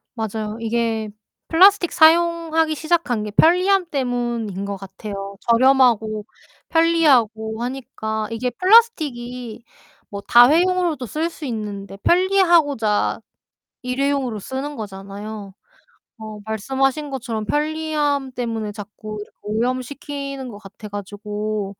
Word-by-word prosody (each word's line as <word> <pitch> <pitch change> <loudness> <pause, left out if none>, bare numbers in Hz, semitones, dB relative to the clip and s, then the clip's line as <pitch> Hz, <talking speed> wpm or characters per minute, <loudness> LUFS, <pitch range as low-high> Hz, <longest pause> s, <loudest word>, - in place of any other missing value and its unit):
맞아요. 220 -1 -4
이게 225 -1 -1 0.4
플라스틱 370 +1 +5
사용하기 325 -1 +3
시작한 315 -9 0
게 210 - -5
편리함 365 - +4
때문인 240 -7 -2
거 200 0 -4
같아요. 195 +1 -8
저렴하고 235 -4 +3 0.4
편리하고 250 -10 +2
하니까 220 -4 -4
이게 245 +2 -2
플라스틱이 250 - +2 0.5
뭐 200 0 -6
다회용으로도 325 +3 +4
쓸 315 +8 -2
수 320 -3 -9
있는데 205 -4 -5
편리하고자 340 - +2 0.6
일회용으로 260 -3 -1
쓰는 270 +7 -5
거잖아요. 200 0 -8 0.7
어 215 -1 -8
말씀하신 270 +7 -1
것처럼 230 -5 -4
편리함 295 -2 -1
때문에 225 -4 -3
자꾸 215 +1 -8 0.3
오염시키는 255 +4 -3
거 205 - -9
같아 205 +1 -11
가지고 205 0 -5
245 Hz, 275 characters per minute, -21 LUFS, 215-300 Hz, 0.7 s, 플라스틱